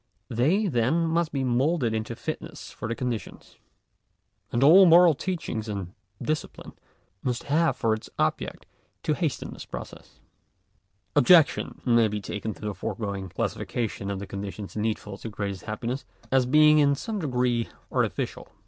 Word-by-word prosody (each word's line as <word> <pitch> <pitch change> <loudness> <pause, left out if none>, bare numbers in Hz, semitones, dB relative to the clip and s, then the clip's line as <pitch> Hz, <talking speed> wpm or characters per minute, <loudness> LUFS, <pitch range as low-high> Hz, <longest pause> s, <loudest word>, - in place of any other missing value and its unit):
They, 155 - +2
then, 150 - +1
must 165 0 0
be 135 -2 -1
moulded 130 0 +1
into 110 +1 -3
fitness 155 +3 -6
for - - -6
the 115 - -2
conditions. 120 -3 -5 0.9
And 120 - +1
all 180 +6 +8
moral 170 0 +7
teaching 155 - -3
and 100 -3 -5 0.3
discipline, 155 0 -4 0.5
must 125 -2 -2
have 160 +4 +2
for 110 -1 +1
its 110 - -5
object, - - -1 0.4
to - - +1
hasten - - -2
this - - -9
process. - - -9 1.0
§8. - - +6
Objection 160 +2 +4
may 120 -3 +4
be 105 0 -3
taken 105 +2 -4
to - - -17
the 105 -1 -3
foregoing 100 -1 -4
classification 105 +1 -3
of 100 - -2
the 100 - -5
conditions 100 +1 -6
needful 105 -2 -3
to 115 - -6
greatest 100 -3 -5
happiness, 115 +5 -3 0.3
as 130 -1 +3
being 150 +2 +6
in 140 -1 +4
some 215 +8 -4
degree 125 -6 0 0.2
artificial. - - -1
120 Hz, 150 wpm, -26 LUFS, 110-155 Hz, 1.0 s, all